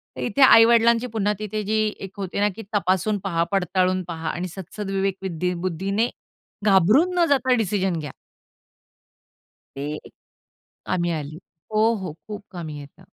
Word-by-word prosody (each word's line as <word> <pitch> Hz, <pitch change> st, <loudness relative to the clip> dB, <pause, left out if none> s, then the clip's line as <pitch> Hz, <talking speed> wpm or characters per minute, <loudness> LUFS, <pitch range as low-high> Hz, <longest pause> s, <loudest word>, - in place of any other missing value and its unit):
तर 130 Hz, -, -6 dB
इथे 200 Hz, -, -1 dB
आई 225 Hz, -3 st, +9 dB
वडिलांची 235 Hz, +1 st, +4 dB
पुन्हा 210 Hz, 0 st, +1 dB
तिथे 215 Hz, 0 st, -3 dB
जी 215 Hz, +2 st, 0 dB, 0.3 s
एक 190 Hz, -, -10 dB
होते 195 Hz, 0 st, -4 dB
ना 205 Hz, 0 st, +3 dB
की 225 Hz, -, -7 dB
तपासून 200 Hz, +2 st, +1 dB
पहा 170 Hz, -3 st, 0 dB
पडताळून 185 Hz, -1 st, +1 dB
पहा 160 Hz, -1 st, -4 dB
आणि 180 Hz, +1 st, -3 dB
सत्सदविवेकविद्दी 190 Hz, -1 st, -3 dB
बुद्धीने 195 Hz, +7 st, -1 dB, 0.6 s
घाबरून 210 Hz, -, +4 dB
न 340 Hz, -, +5 dB
जाता 260 Hz, -2 st, +3 dB
डिसिजन 190 Hz, -5 st, 0 dB
घ्या. 145 Hz, -3 st, -6 dB, 1.6 s
ते 145 Hz, +2 st, -4 dB, 0.9 s
कामी 175 Hz, -1 st, 0 dB
आली. 155 Hz, -1 st, -4 dB, 0.3 s
हो, 220 Hz, +2 st, +3 dB
हो. 185 Hz, -6 st, -5 dB
खूप 210 Hz, -1 st, -7 dB
कामी 160 Hz, -4 st, -6 dB
येतं. 145 Hz, +6 st, -13 dB
195 Hz, 140 wpm, -23 LUFS, 175-215 Hz, 1.6 s, आई